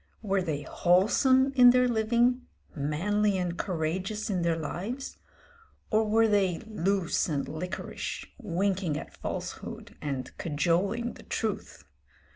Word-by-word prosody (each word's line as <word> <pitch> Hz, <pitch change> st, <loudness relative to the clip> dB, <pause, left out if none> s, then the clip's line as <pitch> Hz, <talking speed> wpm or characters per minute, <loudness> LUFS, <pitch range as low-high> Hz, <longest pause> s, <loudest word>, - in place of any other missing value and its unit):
Were 195 Hz, -2 st, +1 dB
they 155 Hz, -5 st, -2 dB
wholesome 260 Hz, -, +3 dB
in 250 Hz, -2 st, +8 dB
their 250 Hz, 0 st, +5 dB
living, 240 Hz, +2 st, +2 dB, 0.3 s
manly 190 Hz, +8 st, +1 dB
and 175 Hz, -2 st, -2 dB
courageous 185 Hz, +5 st, -2 dB
in 185 Hz, -3 st, 0 dB
their 170 Hz, -1 st, +2 dB
lives, 195 Hz, -, -5 dB, 0.7 s
or 220 Hz, 0 st, +3 dB
were 225 Hz, +1 st, +4 dB
they 195 Hz, -5 st, +2 dB
loose 195 Hz, -4 st, 0 dB
and 145 Hz, -3 st, -1 dB
liquorish, 180 Hz, +5 st, -5 dB
winking 190 Hz, -, 0 dB
at -, -, -8 dB
falsehood -, -, -6 dB
and 135 Hz, -3 st, -4 dB
cajoling 180 Hz, +10 st, 0 dB
the -, -, -13 dB
truth? -, -, -3 dB
195 Hz, 120 wpm, -28 LUFS, 170-220 Hz, 0.7 s, in